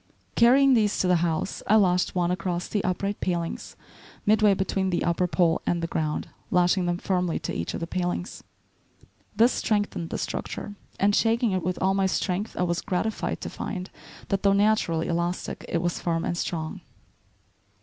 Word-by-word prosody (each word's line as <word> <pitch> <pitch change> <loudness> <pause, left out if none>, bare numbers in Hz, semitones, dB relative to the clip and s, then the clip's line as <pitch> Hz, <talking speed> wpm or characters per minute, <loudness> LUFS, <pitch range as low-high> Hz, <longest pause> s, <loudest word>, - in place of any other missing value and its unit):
Carrying 265 +3 +6
these 215 -4 +2
to 185 - +1
the 180 -1 +4
house, 165 +2 -1
I 215 - +5
lashed 180 -4 +3
one 175 -1 +1
across 180 0 -2
the 205 - -1
upright 195 +3 -2
palings 170 -2 -3 0.5
midway 210 -1 +4
between 190 0 -1
the 175 - 0
upper 175 +1 +1
pole 170 -2 +2
and 175 - +1
the 165 - -2
ground, 155 -2 -2 0.2
lashing 180 0 +2
them 175 0 0
firmly 180 -2 0
to - - -4
each 85 - -3
of - - -4
the - - -1
palings. 175 +1 -3 0.9
This 230 +4 +5
strengthened 205 -6 -1
the - - -3
structure, 205 - -4 0.3
and 205 +1 +3
shaking 230 0 +2
it 185 -1 0
with 180 +2 -2
all 190 +1 +3
my 195 -1 +2
strength 190 +3 -2
I - - +1
was 175 0 0
gratified 215 +2 -2
to - - -4
find 185 -2 -5 0.4
that, 195 - 0
though 200 -1 +4
naturally 200 -5 +2
elastic, 170 +1 -2
it 170 0 0
was 175 -1 -1
firm 165 -1 -1
and 175 - -1
strong. 160 -2 -3
180 Hz, 180 wpm, -26 LUFS, 175-205 Hz, 0.9 s, Carrying